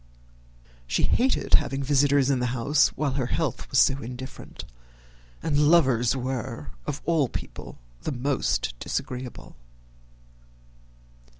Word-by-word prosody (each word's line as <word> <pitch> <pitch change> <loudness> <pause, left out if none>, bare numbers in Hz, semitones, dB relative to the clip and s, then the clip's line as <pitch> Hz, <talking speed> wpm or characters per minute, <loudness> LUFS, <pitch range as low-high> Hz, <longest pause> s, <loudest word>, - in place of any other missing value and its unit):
She - - 0
hated 260 +2 +1
having 135 0 +3
visitors 140 0 +3
in 130 - +1
the 125 - 0
house 140 +5 +4
while 145 -2 0
her 130 -2 -1
health 150 -1 -2
was 130 - 0
so 135 +1 +4
indifferent, 125 +3 -8 0.8
and 150 -1 +3
lovers 130 -8 +4
were 125 - -4 0.2
of 140 - -4
all 160 -7 +2
people - - -8 0.2
the - - -3
most 130 - -1
disagreeable. 125 -1 -5
135 Hz, 115 wpm, -26 LUFS, 125-145 Hz, 0.8 s, house